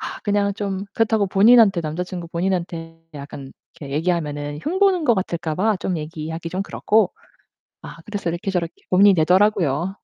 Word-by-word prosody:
아 - - -6
그냥 205 -1 +1
좀 200 -2 -4
그렇다고 220 -2 +2
본인한테 210 -1 +5
남자친구 170 +2 -5
본인한테 170 -2 -3
약간 140 -1 -9 0.3
이렇게 140 -3 -7
얘기하면은 150 -3 -2
흉보는 375 0 +2
것 240 -5 +4
같을까 170 -4 -3
봐 215 +2 +1
좀 185 -3 -2
얘기하기 160 +1 -6
좀 185 +3 -2
그렇고. 210 0 +1 0.7
아 - - -10
그래서 205 -5 -3
이렇게 170 +3 -4
저렇게 175 -3 -2 0.2
고민이 195 +2 +6
되더라고요. 180 -1 +2
180 Hz, 390 characters per minute, -21 LUFS, 165-205 Hz, 0.7 s, 고민이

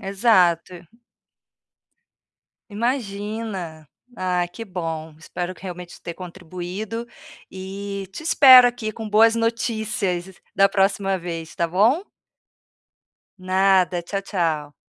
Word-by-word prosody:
Exato. 185 -4 +2 1.9
Imagina. 205 - -4 0.3
Ah, 180 -1 0
que 200 +6 -8
bom, 165 -4 -5
espero 175 +2 -5
que - - -19
realmente 180 -1 -8
ter 170 - -7
contribuído 185 +5 -7 0.4
e 195 +1 -6
te 195 - -8
espero 260 -5 +8
aqui 240 -3 -2
com 220 0 -7
boas 225 +2 +5
notícias 220 -5 -2 0.2
da 195 0 +6
próxima 195 -1 +1
vez, 165 -2 -6
tá 170 -1 -1
bom? 225 - +3 1.4
Nada, 185 -1 +2
tchau, 195 +3 -3
tchau. 160 -7 -2
190 Hz, 100 wpm, -22 LUFS, 175-215 Hz, 1.9 s, espero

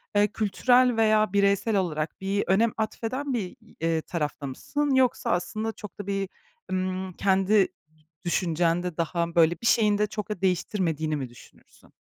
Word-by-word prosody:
eee, 205 0 +5
kültürel 245 +4 +2
veya 215 -2 +3
bireysel 200 +2 +2
olarak 160 -3 -2
bir 195 +1 0
önem 220 +4 +3
atfeden 255 +5 -3
bir 235 - 0 0.2
i - - -21
eee, 165 -1 +1
tarafta 150 -4 -4
mısın 285 - -1
yoksa 255 -2 +2
aslında 215 +6 -1
çok 210 -3 -11
da 200 - -6
bir, 195 -1 -2 0.4
ımm, 185 0 -2
kendi 195 +2 +3 0.6
düşüncende 175 0 0
daha, 170 0 -1
böyle, 165 0 +5
bir - - -6
şeyin 210 -2 +4
de 210 0 +1
çok 210 0 -5
da 210 -4 -4
değiştirmediğini 170 -4 0
mi 135 -4 -4
düşünürsün? 120 - -19
195 Hz, 155 wpm, -26 LUFS, 170-215 Hz, 0.6 s, eee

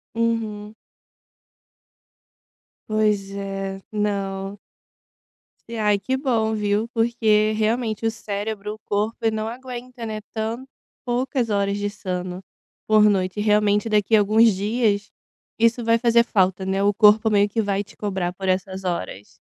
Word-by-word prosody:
Uhum. 220 -2 -2 2.2
Pois 210 -2 +1
é, 195 -1 -4
não. 200 -1 -2 1.1
E, 230 - -5
ai 210 -2 +2
que 260 +5 -1
bom 230 -5 0
viu, 210 +1 0
porque 225 -2 +2
realmente 220 0 -1
o 225 - +2
cérebro, 210 -1 -4
o 215 - -13
corpo 210 +1 -2
,ele 225 -1 +1
não 215 0 -2
aguenta, 250 0 -7
né, 215 -1 -4
tanto 225 +4 -3 0.4
poucas 245 -1 -1
horas 200 -1 0
de 205 0 -2
sono 185 -2 -5 0.4
por 215 -1 +5
noite. 195 -1 +2
Realmente 210 0 +2
daqui 210 0 +3
alguns 215 +2 +5
dias 210 0 0 0.5
isso 230 +1 +3
vai 230 0 +3
fazer 235 0 +4
falta, 190 -4 +1
né, 195 +1 0
o 205 - +3
corpo 215 +1 +5
meio 205 -1 +3
que 220 +2 -1
vai 200 -1 -1
te - - -18
cobrar 190 -4 -2
por 190 0 -6
essas 190 +1 -1
horas. 105 - -4
210 Hz, 140 wpm, -23 LUFS, 200-225 Hz, 2.2 s, por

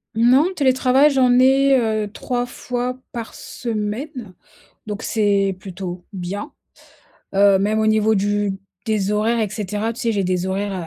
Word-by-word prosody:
Non, 250 +6 +5
télétravail, 260 +1 +4
j'en 255 -3 +3
ai, 270 +1 +5
heu, 220 -4 0
3 245 +2 -3
fois 250 +1 -4
par 230 -2 -6
semaine. 225 - -5 0.5
Donc 210 0 -5
c'est 200 -3 +1
plutôt 185 -2 -7
bien. 195 - -5 0.9
Heu, 195 -1 +5
même 215 +2 +1
au 220 - +1
niveau 215 0 +3
du 205 0 0 0.3
des 210 -2 0
horaires 220 +3 +1
et 215 -3 0
cetera, 210 +2 -3
tu - - -8
sais, 230 - +1
j'ai 200 -3 0
des 185 0 -1
horaires, 195 +1 -2
215 Hz, 150 wpm, -20 LUFS, 200-245 Hz, 0.9 s, Non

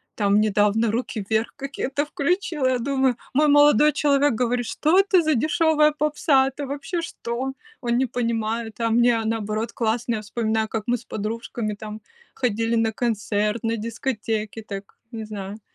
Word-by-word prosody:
Там 205 -1 +3
недавно 210 +1 +2
"Руки 225 -2 -3
вверх" 220 +1 0
какие-то 275 +1 -3
включила. 300 -2 -1
Я 255 -1 +1
думаю, 265 0 +1 0.2
мой 300 +3 +4
молодой 295 +1 +6
человек 285 -2 +3
говорит: 245 +1 0
"Что 315 +10 +2
это 385 -3 +4
за 310 -3 +2
дешевая 310 +2 +3
попса? 295 -2 +2
Это 280 +2 -5
вообще 290 +5 -3
что?" 260 -4 -4 0.3
Он 240 -1 0
не 260 - +2
понимает, 230 -1 -2
а 230 - +1
мне, 235 +1 +4
а, 225 - -3
наоборот, 220 0 -2
классно. 235 +1 -1
Я 215 - -4
вспоминаю, 220 0 -1
как 220 -1 -3
мы 245 +1 +2
с 235 - -16
подружками 215 0 -4
там 215 +1 -8 0.3
ходили 230 -2 0
на 225 -1 +2
концерт, 210 -1 -1
на 230 0 0
дискотеки 225 -1 -3
так, 200 -2 -8
не 225 -1 -5
знаю. 205 0 -7
235 Hz, 165 wpm, -23 LUFS, 220-275 Hz, 0.3 s, молодой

